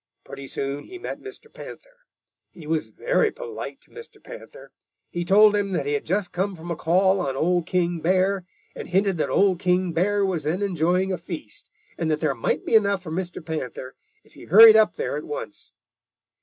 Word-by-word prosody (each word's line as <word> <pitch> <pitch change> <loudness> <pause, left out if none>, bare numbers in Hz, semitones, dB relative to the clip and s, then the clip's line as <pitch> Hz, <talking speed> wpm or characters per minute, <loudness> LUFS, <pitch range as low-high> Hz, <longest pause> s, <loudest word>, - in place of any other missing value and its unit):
Pretty 135 0 -10
soon 140 +2 -4
he 370 - -10
met 360 - -6
Mr. 405 +2 -10
Panther. - - -13 0.4
He 165 - -14
was 160 0 -1
very 485 -2 0
polite 455 0 -8
to - - -22
Mr. 460 0 -12
Panther. - - -12 0.4
He 175 - -3
told 210 +4 +5
him 200 -1 -1
that 145 - -1
he 145 - -1
had 145 - -3
just 190 +2 -1
come 190 +2 -2
from 170 +1 -8
a - - -1
call 190 +5 +2
on 135 -7 -2
Old 175 +3 0
King 175 -2 0
Bear, 185 +3 +1 0.3
and - - -7
hinted 190 -1 +1
that - - 0
Old 195 -3 +2
King 180 -1 +1
Bear 200 +4 +1
was 185 -4 -1
then 160 +7 -2
enjoying 180 0 0
a 180 - -4
feast 165 - -8 0.3
and 165 - -1
that 155 -1 0
there 155 - 0
might - - -2
be - - -3
enough 200 -3 +3
for 160 - -8
Mr. 175 -1 -5
Panther, 130 -5 -5 0.3
if - - -25
he - - -13
hurried 220 +5 +9
up 220 -1 +4
there 465 - -3
at - - -6
once. 475 +2 -7
185 Hz, 200 wpm, -24 LUFS, 165-205 Hz, 0.4 s, hurried